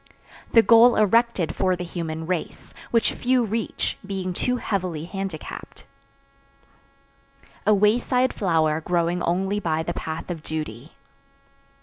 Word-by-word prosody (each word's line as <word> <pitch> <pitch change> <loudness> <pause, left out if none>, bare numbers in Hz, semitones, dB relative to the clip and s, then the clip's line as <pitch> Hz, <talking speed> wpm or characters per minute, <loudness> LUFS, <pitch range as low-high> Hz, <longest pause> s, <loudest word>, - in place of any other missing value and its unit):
The 230 - +7
goal 235 +1 +7
erected 215 -4 +2
for 185 -1 +1
the 180 - -5
human 160 -2 -5
race, 180 0 -4 0.2
which 230 -1 +2
few 250 0 +1
reach, 225 +1 -2
being 190 -2 -4
too 250 +7 0
heavily 180 -8 -3
handicapped. 195 -3 -7 1.8
A 215 - +6
wayside 245 +5 +2
flower 160 -5 +1
growing 175 +1 0
only 190 +4 0
by 160 -4 -1
the - - -3
path 160 +2 -5
of 165 -3 -5
duty. 150 -4 -6
185 Hz, 120 wpm, -24 LUFS, 160-215 Hz, 1.8 s, The